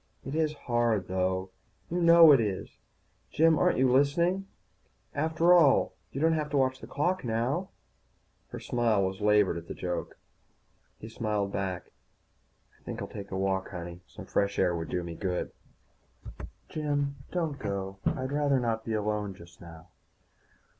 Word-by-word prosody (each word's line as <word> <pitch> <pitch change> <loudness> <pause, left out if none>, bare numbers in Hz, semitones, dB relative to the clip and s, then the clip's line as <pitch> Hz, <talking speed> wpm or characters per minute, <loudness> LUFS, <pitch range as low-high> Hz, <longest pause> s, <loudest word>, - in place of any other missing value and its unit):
"It 135 - -5
is 155 -1 +1
hard, 120 -7 0
though, 95 0 -1 0.4
you 175 +1 0
know 170 -1 +8
it 140 - +6
is 100 -4 -3 0.5
Jim, 160 0 +3
aren't 180 - +3
you 130 +1 +4
listening? 170 +9 +2 0.7
After 160 +4 +3
all, 160 -6 +5 0.2
you 135 - -5
don't 160 +2 +3
have 155 -2 -1
to 145 - 0
watch 130 -1 +1
the - - -10
clock 180 +6 -1
now." 125 +10 -1 0.8
Her - - -8
smile 115 -5 +1
was 95 0 -2
as - - -14
labored 105 -4 +3
as 85 - -14
the - - -6
joke. 90 -1 -4 0.8
He 110 - -10
smiled 105 -3 -2
back. 95 -3 -4 0.9
"I - - -31
think - - -6
I'll - - -4
take 100 -1 -8
a 95 - -4
walk, 95 0 -1
honey. 85 -2 -7
Some - - -11
fresh 100 0 0
air 90 -2 +2
would 80 -1 -4
do 90 - -2
me 85 -1 -6
good." 90 +1 -3 1.2
"Jim, 145 -2 -2
don't 160 -5 -2
go. 95 -2 -4
I'd 130 +1 -1
rather 145 -2 +2
not 115 -2 -1
be 115 - -3
alone 105 -2 -2
just 85 -1 -16
now." 85 0 -13
115 Hz, 165 wpm, -29 LUFS, 95-145 Hz, 1.2 s, know